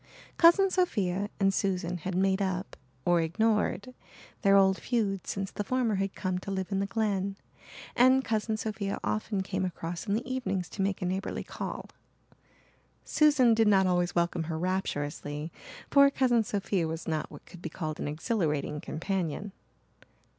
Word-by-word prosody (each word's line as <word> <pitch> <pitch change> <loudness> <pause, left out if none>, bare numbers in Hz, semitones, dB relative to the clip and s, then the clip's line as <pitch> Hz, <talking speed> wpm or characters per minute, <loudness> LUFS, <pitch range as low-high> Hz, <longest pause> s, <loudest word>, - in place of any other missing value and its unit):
Cousin 375 +3 +6
Sophia 205 - 0
and 195 -1 +3
Susan 180 -2 -1
had 180 +3 -4
made 190 +1 +2
up, 190 0 -2 0.3
or 175 -1 +4
ignored, 215 +6 0 0.5
their 195 0 +5
old 190 -1 +5
feud 205 -6 -1
since 195 -1 -3
the 205 - -3
former 245 0 0
had 195 0 -2
come 185 -1 -2
to 190 - -8
live 190 0 -3
in 195 - +1
the 195 - 0
Glen, 200 -2 -1 0.6
and 260 +2 +5
Cousin 220 0 0
Sophia 210 -2 -3
often 210 -2 -1
came 190 0 -2
across 175 +1 -4
in 200 - +1
the 230 - -3
evenings 240 -9 -2
to 200 - -5
make 195 -1 -1
a - - 0
neighbourly 190 +2 -2
call. - - -6 1.2
Susan 290 -6 +4
did 225 -1 +3
not 195 -2 +5
always 175 -1 +1
welcome 170 -1 0
her 160 0 -3
rapturously 150 -4 -3 0.4
for 280 0 +7
Cousin 250 -4 +2
Sophia 195 -4 -1
was 160 +1 -5
not 155 -2 -2
what 145 - -12
could 180 - -13
be 165 - -4
called 155 -2 -5
an - - -3
exhilarating 150 - -1
companion. 185 +3 -3
195 Hz, 160 wpm, -29 LUFS, 175-215 Hz, 1.2 s, for